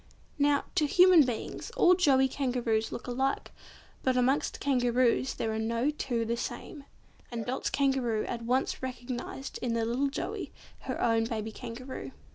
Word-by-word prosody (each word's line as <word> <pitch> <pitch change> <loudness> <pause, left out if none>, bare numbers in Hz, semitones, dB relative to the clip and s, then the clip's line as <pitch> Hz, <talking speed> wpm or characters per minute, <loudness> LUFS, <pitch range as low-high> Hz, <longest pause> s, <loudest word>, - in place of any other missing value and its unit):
Now, 285 0 +3
to 300 - +2
human 360 +1 +7
beings, 240 - -4
all 360 -7 +6
joey 275 -7 +4
Kangaroos 245 -5 -1
look - - -6
alike, 265 +2 -1 0.5
but 260 -1 +1
amongst 260 +3 +1
Kangaroos 250 -1 +2
there 220 - -2
are 220 - -2
no 230 +5 0
two 240 -6 -2
the 230 +1 0
same, 290 +4 -6 0.5
and 230 -2 -4
Dot's 255 +1 -2
Kangaroo 265 -6 +1
at 235 - -4
once 250 +3 0
recognised 255 +1 -5
in 235 -2 -1
the 230 -1 +1
little 250 +5 +1
Joey 275 - -4 0.4
her - - -2
own 225 -1 +2
baby 220 -1 -3
Kangaroo. 240 - -7
250 Hz, 155 wpm, -29 LUFS, 230-275 Hz, 0.5 s, human